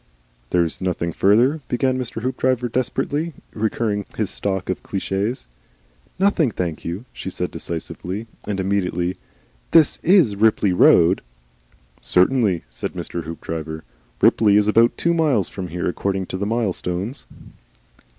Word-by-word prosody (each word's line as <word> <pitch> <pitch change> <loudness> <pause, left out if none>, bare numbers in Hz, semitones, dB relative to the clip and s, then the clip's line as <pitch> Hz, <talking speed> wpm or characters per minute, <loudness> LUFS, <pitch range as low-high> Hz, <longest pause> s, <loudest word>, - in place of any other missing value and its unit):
"There's 85 -2 +1
nothing 85 -2 -1
further," 120 - +3
began 130 +1 0
Mr. 120 -2 -5
Hoopdriver 130 -1 0
desperately, 145 +6 -1 0.2
recurring 105 -2 -1
to - - -23
his 105 -2 -1
stock 95 -2 -2
of 95 - -2
cliches. 100 - -2 0.7
"Nothing, 190 -7 +3
thank 90 -6 -4
you," 90 +8 -5
she - - -6
said - - -3
decisively. 90 +5 -5 0.2
And 100 -2 -2
immediately, 95 -2 -1 0.5
"This 160 -3 +5
IS 175 - +5
the 100 - -6
Ripley 105 -2 +3
road?" 90 +1 +5 0.8
"Certainly," 95 -2 +3
said - - -6
Mr. 85 -2 -5
Hoopdriver. 80 -1 -5 0.4
"Ripley 105 -2 +5
is 105 0 +3
about 115 +2 +4
two 170 - +2
miles 150 - +2
from 95 -2 -6
here. 90 +1 -3
According 95 +1 -1
to - - -1
the 100 +2 -2
mile 115 -3 0
stones." 95 +12 -4
100 Hz, 140 wpm, -21 LUFS, 90-125 Hz, 0.8 s, This